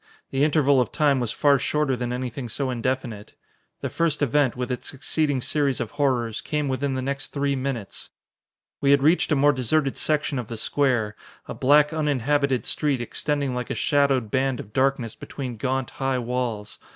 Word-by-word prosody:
The 135 +1 +1
interval 145 -3 +4
of 125 - -2
time 145 -3 +2
was 120 -3 -1
far 140 -2 +3
shorter 150 -1 0
than 120 0 -3
anything 125 0 -4
so 130 +3 -1
indefinite. 120 -3 -3 0.5
The - - -2
first 165 -3 0
event, 145 -1 +2
with 125 +1 -3
its 125 - -4
succeeding 145 0 -1
series 140 -1 0
of 120 - -3
horrors, 125 -6 0
came 150 -1 -2
within 135 +1 -1
the 130 - -2
next 140 +1 -1
three 140 -1 -1
minutes. 130 -6 -4 0.7
We 140 - +1
had 140 -1 +5
reached 160 +2 +3
a - - +4
more 145 +1 +4
deserted 135 +2 0
section 150 -3 0
of 120 - -5
the 115 - -6
square, 120 -4 +1 0.3
a - - -5
black, 150 +3 +4
uninhabited 145 -3 +1
street 145 -4 0
extending 140 +3 -1
like 125 0 -4
a - - -2
shadowed 135 -6 +1
band 130 -1 0
of 105 - -9
darkness 130 -4 +1
between 125 -4 -7
gaunt, 130 +2 -2
high 135 -1 -1
walls. 115 -5 -3
135 Hz, 180 wpm, -24 LUFS, 125-145 Hz, 0.7 s, had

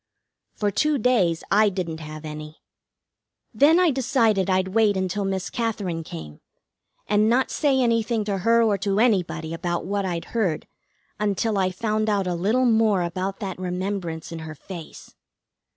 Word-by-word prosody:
For 205 -1 0
two 300 +8 +1
days 210 -9 +2
I 210 +1 +5
didn't 175 -4 -4
have 155 0 -8
any. 150 0 -8 0.9
Then 295 +9 +5
I 360 -3 +4
decided 235 -7 +1
I'd 185 0 +1
wait 210 -1 +3
until 190 +2 -1
Miss 190 -1 -2
Katherine 205 -8 -2
came, 80 - -9 0.6
and 210 +1 +3
not 255 +3 +2
say 280 -3 +2
anything 230 -2 +1
to 200 -2 -2
her 230 +4 +4
or 205 -3 +2
to 200 +1 0
anybody 180 -8 +1
about 175 +1 -2
what 200 +1 -1
I'd 175 -3 -3
heard 195 -10 0 0.5
until 210 0 0
I 185 -1 +2
found 215 +3 -1
out 200 -2 +1
a 180 - -1
little 215 +9 +1
more 220 -5 +3
about 185 +3 -3
that 190 -3 -4
remembrance 180 -3 -3
in 165 - -5
her 160 -1 -7
face. 170 +1 -10
195 Hz, 160 wpm, -24 LUFS, 175-225 Hz, 0.9 s, I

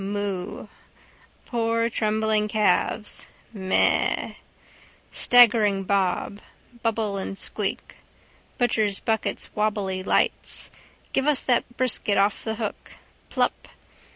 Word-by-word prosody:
Moo. 200 -2 -4 0.8
Poor 230 -1 0
trembling 215 -1 0
calves. 210 0 0 0.3
Meh. 190 -3 +1 0.8
Staggering 220 -5 +5
bob. 195 +1 -1 0.4
Bubble 220 -3 -1
and 195 0 -5
squeak. - - -2 0.6
Butchers' 215 -5 +1
buckets 220 -1 -2
wobbly 205 -3 -1
lights. 185 - +1 0.4
Give 270 +2 +1
us 295 -3 +3
that 245 -1 0
brisket 230 -5 +1
off 200 +1 +1
the 220 -1 -3
hook. 220 -2 -6 0.4
Plup. - - -1
210 Hz, 95 wpm, -24 LUFS, 200-230 Hz, 0.8 s, Staggering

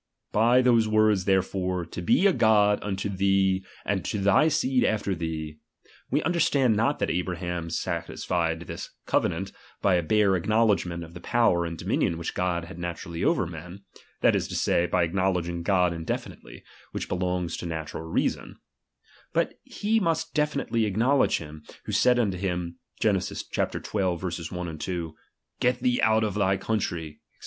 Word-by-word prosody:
By 120 +4 +4
those 115 -3 +4
words 110 -3 +3
therefore, 95 -2 0
fo 85 - -7
be 130 - +3
a 195 - +5
God 105 -4 +4
unto 100 0 -3
thee 95 -1 +2 0.2
and 100 -2 -1
to - - -2
thy 100 +10 +4
seed 135 -5 +2
after 105 -2 0
thee, 80 -3 -4 0.5
we - - +1
understand 145 -8 +2
not 115 +7 +1
that - - -1
Abraham 90 -1 -3
satisfied 80 0 -2
this - - -7 0.2
cove - - +2
nant - - -4 0.3
by 100 - +2
a 90 - +3
bare 100 +3 +3
acknowledgment 100 -3 +1
of 80 0 -11
the 85 - -10
power 90 -8 +2
and 85 0 -6
dominion 85 +2 0
which 85 - -4
God 85 -2 -1
had 85 0 -10
naturally 85 -1 -5
over 165 - +2
men, 90 +4 -9 0.4
that - - +4
is - - 0
to - - -6
say, 85 - +2
by 90 -1 +2
acknowledging 85 -1 0
God 90 -1 +2
indefinitely, 80 -1 -6 0.3
which - - -3
belongs 90 -1 -1
to 85 - -5
natural 80 -1 -5
reason; 80 - -2 0.8
but - - 0
he 220 +2 0
must 165 -5 -1
definitely 140 -7 0
acknowledge 115 +7 +2
hira, 75 -1 -9 0.2
who - - -4
said 125 -1 +4
unto 100 -6 +1
him, 90 -2 -3 0.2
(Gen. - - +3
xii. - - -6
1,2): 85 -3 -3 0.5
^et 125 0 +2
thee 125 -1 +1
out 110 0 +3
of 105 -2 -1
thy 95 -1 +2
country; 85 -9 -3
Sfc. - - -56
95 Hz, 160 wpm, -26 LUFS, 85-110 Hz, 0.8 s, a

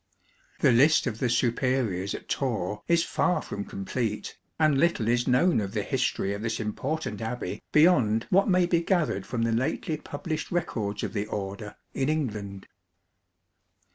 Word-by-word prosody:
The - - +5
list 145 +7 +5
of 115 -3 -3
the 125 - +1
superiors 120 -5 0
at - - -9
Torre 105 -6 -2
is 170 0 +3
far 180 - +1
from 100 - -5
complete, 105 +3 -3 0.2
and 155 -3 +3
little 170 -9 +2
is 120 +1 +2
known 130 +2 +3
of 100 -1 -4
the - - -1
history 100 - -1
of 100 - -5
this 115 0 -2
important 115 +2 -3
abbey 120 +2 -4
beyond 125 -9 +4
what 195 +3 +4
may 180 -1 +4
be 170 -1 +2
gathered 170 - 0
from 115 -1 -1
the 115 - +1
lately 140 +6 -1
published 155 +3 -5
records 110 - -2
of - - -3
the 105 -1 -2
Order 105 +1 -5 0.2
in 135 +1 0
England. 105 -10 -3
120 Hz, 160 wpm, -27 LUFS, 105-155 Hz, 0.2 s, The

